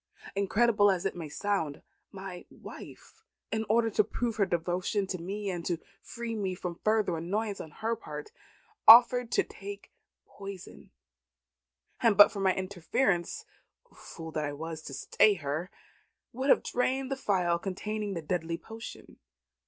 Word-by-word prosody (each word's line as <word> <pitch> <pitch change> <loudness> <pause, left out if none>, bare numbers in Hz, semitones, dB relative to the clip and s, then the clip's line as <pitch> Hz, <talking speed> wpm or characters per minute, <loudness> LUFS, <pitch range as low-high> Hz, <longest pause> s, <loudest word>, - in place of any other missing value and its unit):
Incredible 205 +1 +3
as 190 -1 0
it 195 - -1
may 165 -3 -6
sound, 165 -4 -2 0.3
my 190 -2 -8
wife, 445 - -12 0.3
in 220 0 -1
order 225 +1 +3
to 215 - +4
prove 230 +1 -3
her 200 -3 +3
devotion 180 +4 -1
to 185 -1 -4
me 200 +4 -4
and 175 -2 -4
to 175 - 0 0.2
free 235 -1 -6
me 190 -4 -2
from 180 -1 -6
further 215 -5 +2
annoyance 200 +5 -2
on 160 - -8
her 225 +9 -2
part, 150 -9 -8 0.6
offered 240 +1 +9
to - - +4
take 200 0 -9 0.3
poison; 195 -2 -10 1.1
and 225 -4 +4
but 205 - +9
for 200 - -6
my 190 -1 +2
interference 185 0 -1 0.5
(fool 160 -1 -9
that 155 - -2
I 145 - -3
was 160 +2 -6
to 140 - -7
stay 205 +8 +3
her!) 155 +2 -3 0.6
would 260 +4 -2
have - - +5
drained 260 +2 -1
the - - +1
phial 180 -9 +1
containing 205 +2 -3
the 165 - -4
deadly 165 0 -2
potion. 225 +4 -10
195 Hz, 150 wpm, -30 LUFS, 175-220 Hz, 1.1 s, offered